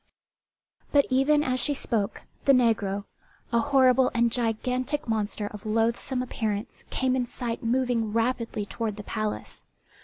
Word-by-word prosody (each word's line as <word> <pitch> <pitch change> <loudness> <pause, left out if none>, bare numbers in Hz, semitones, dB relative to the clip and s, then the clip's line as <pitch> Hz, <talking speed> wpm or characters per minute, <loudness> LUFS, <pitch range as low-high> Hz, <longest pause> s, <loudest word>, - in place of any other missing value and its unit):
But 285 -1 +5
even 290 +3 +4
as 255 -2 0
she 290 +3 +1
spoke, 220 -6 -1 0.2
the 275 - +6
negro, 205 -5 +2 0.5
a 235 - +5
horrible 260 0 +4
and 235 0 +3
gigantic 250 +5 -1
monster 215 -1 -1
of 205 0 -7
loathsome 230 +3 0
appearance, 220 -2 -3
came 260 -1 +1
in 250 -2 0
sight 235 -1 -4
moving 240 -2 +1
rapidly 230 -2 -1
toward 220 0 -3
the 210 - -8
palace. 215 0 -4
235 Hz, 140 wpm, -27 LUFS, 220-255 Hz, 0.5 s, the